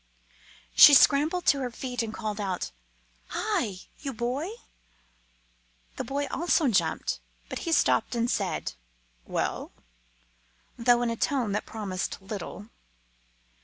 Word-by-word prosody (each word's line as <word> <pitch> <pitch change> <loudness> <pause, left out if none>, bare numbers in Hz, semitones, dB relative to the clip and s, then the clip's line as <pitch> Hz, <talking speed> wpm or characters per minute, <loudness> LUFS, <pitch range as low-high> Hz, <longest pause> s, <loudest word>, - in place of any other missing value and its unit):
She 290 - +10
scrambled 305 +7 +4
to 280 - +4
her 255 -2 -2
feet 245 0 -4
and 225 -1 -3
called 215 -1 -4
out, 190 - -3 0.6
"Hi! 195 -4 -2 0.2
you 275 -2 -5
boy!" 250 - -2 1.5
The - - -2
boy 285 +1 -2
also 340 -2 +2
jumped. 210 - 0 0.3
But - - -4
he - - -1
stopped 320 - +2
and 235 0 +1
said, - - -2 0.5
"Well?" - - -2 1.0
though 245 0 +3
in 235 - 0
a - - -2
tone 245 -3 0
that 210 - -2
promised 200 -4 -4
little. 200 +1 -7
240 Hz, 125 wpm, -27 LUFS, 210-280 Hz, 1.5 s, She